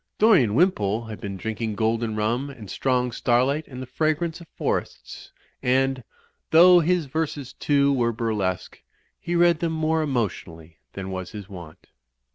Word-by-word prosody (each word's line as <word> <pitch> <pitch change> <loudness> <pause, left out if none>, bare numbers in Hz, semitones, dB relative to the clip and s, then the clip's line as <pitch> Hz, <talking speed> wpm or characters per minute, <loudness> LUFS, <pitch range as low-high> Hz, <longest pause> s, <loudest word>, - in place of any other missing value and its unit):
Dorian 175 - +4
Wimpole 115 - +2
had 110 -1 -8
been 100 -2 -5
drinking 110 +2 -4
golden 110 +1 0
rum 115 +6 -1
and 110 -8 -10
strong 125 -2 0
starlight 130 +6 +1
and 130 -1 -8
the - - -7
fragrance 155 +5 -1
of 170 - -13
forests; - - -4 0.3
and, 130 0 +1 0.5
though 175 +2 +7
his 175 0 +1
verses, 145 -2 -4
too, 140 -1 +2
were 120 -3 +1
burlesque, 105 -5 -3 0.4
he 175 0 -3
read 170 -1 +4
them 165 -1 -1
more 160 0 0
emotionally 90 - -4
than 95 -1 -6
was 95 0 -6
his 105 -3 -8
wont. 85 -6 -11
125 Hz, 150 wpm, -24 LUFS, 110-155 Hz, 0.5 s, though